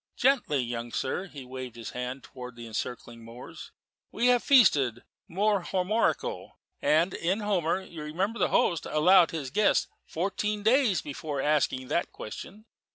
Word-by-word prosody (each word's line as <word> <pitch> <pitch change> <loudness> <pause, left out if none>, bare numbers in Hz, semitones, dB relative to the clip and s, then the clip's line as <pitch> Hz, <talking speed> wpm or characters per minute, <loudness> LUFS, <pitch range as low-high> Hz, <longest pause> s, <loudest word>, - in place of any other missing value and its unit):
"Gently, 245 - +2
young 120 0 -5
sir." 180 +12 -2
He 140 -7 -10
waved 130 -2 -7
his 115 -2 -7
hand 125 +1 -5
towards 125 -2 -10
the 120 - -8
encircling 115 +1 -6
moors. 115 +2 -11 0.4
"We 235 - -1
have 245 -1 +4
feasted 140 - +4 0.2
more 200 +3 +1
Homerico, 190 +5 -1 0.3
and 160 +5 +3
in 190 +6 -1
Homer, 190 -3 0
you 170 -4 -10
remember 185 +10 -2
the - - +3
host 170 -3 +1
allowed 170 +3 +5
his 145 -6 -5
guest 210 +6 +2 0.2
fourteen 205 +4 -2
days 230 - +3
before 145 0 -5
asking 135 -3 0
that 170 - 0
question. 200 - -9
160 Hz, 150 wpm, -28 LUFS, 130-200 Hz, 0.4 s, allowed